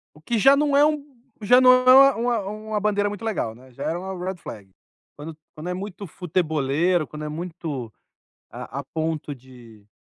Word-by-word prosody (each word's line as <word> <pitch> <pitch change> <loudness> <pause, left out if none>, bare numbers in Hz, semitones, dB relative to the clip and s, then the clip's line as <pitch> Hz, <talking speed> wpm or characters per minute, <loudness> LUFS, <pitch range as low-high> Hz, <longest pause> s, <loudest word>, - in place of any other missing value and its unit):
O 150 - -17
que 230 +9 -2
já 270 +6 +6
não 290 -1 +2
é 290 - +6
um 300 -1 -1 0.3
já 245 +4 +5
não 255 0 +7
é 255 0 +3
uma 275 +1 +8
uma 235 0 0
uma 215 0 -4
bandeira 205 0 +1
muito 205 +1 -7
legal, 200 - -2
né, 130 +2 -18
já - - -10
é 165 - -1
uma 190 +2 -6
red 190 0 -3
flag, 105 - -11 0.5
quando 155 +2 -9 0.2
quando 155 +2 -7
é - - -2
muito 200 +1 -7
futeboleiro, 160 -1 0
quando 150 +1 -8
é - - -4
muito 155 -7 -6 0.6
a 135 - -7
a - - -10
ponto 155 0 -4
de 120 -5 -17
180 Hz, 200 wpm, -23 LUFS, 150-220 Hz, 0.6 s, uma